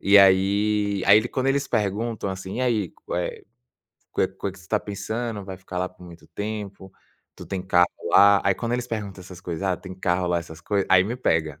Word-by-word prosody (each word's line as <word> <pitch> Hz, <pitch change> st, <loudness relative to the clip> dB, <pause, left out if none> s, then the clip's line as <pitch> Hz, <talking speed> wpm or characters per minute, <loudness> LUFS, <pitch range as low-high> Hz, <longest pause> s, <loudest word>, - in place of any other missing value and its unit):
E 100 Hz, +1 st, +6 dB
aí 100 Hz, +1 st, +3 dB
aí 105 Hz, +4 st, +6 dB
quando 130 Hz, 0 st, -2 dB
eles 140 Hz, +1 st, +1 dB
perguntam 105 Hz, +1 st, -1 dB
assim: 95 Hz, +1 st, -5 dB
"E -, -, -1 dB
aí, 110 Hz, -8 st, +1 dB
co -, -, -8 dB
eh, 90 Hz, -, -3 dB, 0.7 s
coe -, -, +1 dB
coe 100 Hz, -, -5 dB
que 95 Hz, -, -15 dB
você 95 Hz, -, -16 dB
está 105 Hz, +2 st, +1 dB
pensando, 105 Hz, +1 st, -4 dB
vai 95 Hz, -1 st, -7 dB
ficar 90 Hz, -1 st, -7 dB
lá 90 Hz, 0 st, -1 dB
por 90 Hz, -, -19 dB
muito 85 Hz, -1 st, -13 dB
tempo? 100 Hz, -2 st, -6 dB, 0.4 s
Tu -, -, -9 dB
tem 95 Hz, -1 st, -3 dB
carro 90 Hz, -1 st, +4 dB, 0.2 s
lá?". 100 Hz, 0 st, +7 dB
Aí, 100 Hz, -, +3 dB
quando 115 Hz, +3 st, -3 dB
eles 125 Hz, 0 st, -1 dB
perguntam 105 Hz, -5 st, -5 dB
essas 90 Hz, 0 st, -11 dB
coisas, 85 Hz, -1 st, -5 dB
"ah, 95 Hz, -2 st, +1 dB
tem 95 Hz, +1 st, -9 dB
carro 90 Hz, -1 st, 0 dB
lá", 85 Hz, -1 st, +2 dB
essas 80 Hz, -1 st, -9 dB
coisas, 100 Hz, -2 st, 0 dB
aí 95 Hz, -1 st, +6 dB
me 115 Hz, +5 st, -3 dB
pega, 80 Hz, -, 0 dB
100 Hz, 215 wpm, -24 LUFS, 90-105 Hz, 0.7 s, lá